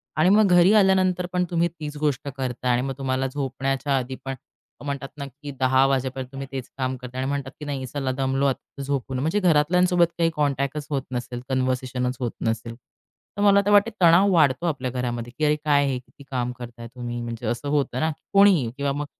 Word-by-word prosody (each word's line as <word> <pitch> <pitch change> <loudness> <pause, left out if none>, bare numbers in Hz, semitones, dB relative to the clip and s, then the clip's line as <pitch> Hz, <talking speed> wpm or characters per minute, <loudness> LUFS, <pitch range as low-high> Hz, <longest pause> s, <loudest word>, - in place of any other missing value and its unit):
आणि 155 +4 +4
मग 210 +1 +5
घरी 175 +2 +6
आल्यानंतर 190 -3 +3
पण 180 0 +2
तुम्ही 170 0 +2
तीच 155 -3 -8
गोष्ट 145 -1 -1
करताय. 125 -1 -1
आणि 120 +1 +2
मग 135 0 -3
तुम्हाला 135 -1 -1
झोपण्याच्या 135 0 -1
आधी 130 0 -3
पण, 135 0 -3 0.5
म्हणतात 140 -1 -3
ना, 140 - -5
की 145 +2 -9
10 130 +1 +4
वाजेपर्यंत 130 -1 -1
तुम्ही 135 0 -6
तेच 135 -2 -5
काम 130 0 -1
करताय. 125 +1 -6
आणि 135 - -1
म्हणतात 140 -2 -3
की, 150 - -7
नाही 140 -2 -3
चला 135 +1 -2
दमलो 135 +1 0
आता 140 +1 -3
झोपू. 135 -1 -3
म्हणजे 155 +10 0
घरातल्यांसोबत 175 +1 +3
काही 165 -1 +3
कॉन्टॅक्टच 140 0 -1
होत 140 -3 0
नसेल, 120 0 -4
कन्व्हर्सेशनच 130 -1 -1
होत 120 -3 -2 0.2
नसेल. 115 +1 -2 0.6
तर 205 - -1
मला 200 -1 +6
तर 205 - +2
वाटतं, 205 +2 +5
तणाव 185 +4 +6
वाढतो 150 -2 +3
आपल्या 135 -6 -1
घरामध्ये. 120 -2 -3
की, 155 - +1
अरे, 150 0 +3
काय 145 -1 +4
हे? 130 -2 0
किती 140 +3 -18
काम 125 -2 -1
करताय 120 -1 -8
तुम्ही 120 -1 -5
म्हणजे 115 -1 -6
असं 120 +4 -2
होतं 140 -3 0
ना, 160 - +1
की - - -13
कोणीही 195 - +5
किंवा 140 0 0
मग 145 +1 -3
135 Hz, 205 wpm, -24 LUFS, 130-155 Hz, 0.6 s, घरी